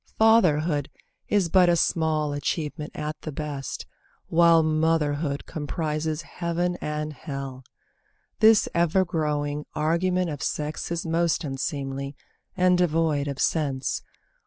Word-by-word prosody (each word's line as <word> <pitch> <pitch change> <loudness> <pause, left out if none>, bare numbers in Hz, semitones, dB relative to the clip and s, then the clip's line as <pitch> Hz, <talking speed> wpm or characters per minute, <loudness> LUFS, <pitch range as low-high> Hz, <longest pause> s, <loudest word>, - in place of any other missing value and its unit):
Fatherhood 165 -10 +3 0.4
Is 200 -4 +3
but 180 +1 +5
a 175 - +4
small 155 -3 +1
achievement 150 +1 -3
at 150 0 -5
the 155 - -5
best, 145 -2 -5 0.4
While 165 -1 +5
motherhood 155 -2 0
comprises 155 +1 -3
heaven 175 +1 -2
and 150 0 -3
hell.) 135 -3 -6 0.8
This 220 -1 +6
ever 175 +2 +3
growing 150 -3 -2
argument 170 +3 +1
of 145 - -6
sex 150 +2 -3
Is 170 0 -2
most 165 +1 +1
unseemly, 140 0 -4 0.4
and 180 -1 +4
devoid 160 -4 +1
of 140 -2 -3
sense. 140 -5 0
155 Hz, 115 wpm, -25 LUFS, 145-170 Hz, 0.8 s, This